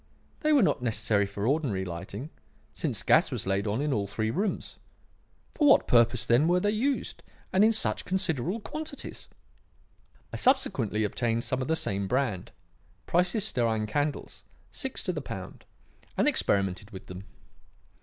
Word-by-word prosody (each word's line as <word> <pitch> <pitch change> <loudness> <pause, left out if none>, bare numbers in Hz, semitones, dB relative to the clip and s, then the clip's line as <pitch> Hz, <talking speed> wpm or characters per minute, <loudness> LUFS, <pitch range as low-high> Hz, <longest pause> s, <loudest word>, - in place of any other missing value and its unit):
They 305 - +1
were 285 -6 +5
not 185 - +1
necessary 110 -3 +1
for 100 +1 -4
ordinary 125 -9 0
lighting, 95 - -6 0.4
since - - -2
gas - - +4
was - - -3
laid 95 +2 0
on 105 +6 0
in 150 -2 0
all 100 -3 -1
three 110 +2 -2
rooms. 195 - -2 0.7
For 295 - +2
what 275 - +6
purpose, 120 0 +4
then, 125 +7 +4
were 180 +1 +3
they 205 +3 +1
used, 255 +6 -1 0.3
and 190 +2 +5
in 220 - +6
such 220 - 0
considerable 180 - -1
quantities? 305 +3 -7 1.0
I - - -3
subsequently 135 - +2
obtained 115 +2 0
some 130 0 -1
of 130 - -3
the 160 - +2
same 100 -10 -2
brand 120 -7 -1 0.5
Price's 180 +4 +1
stearine 115 - +1
candles, 145 +7 -3 0.3
six - - -3
to - - -1
the - - -4
pound - - -8 0.5
and - - +3
experimented 95 0 +1
with 95 -4 -10
them. 90 +1 -9
125 Hz, 155 wpm, -28 LUFS, -, 1.0 s, what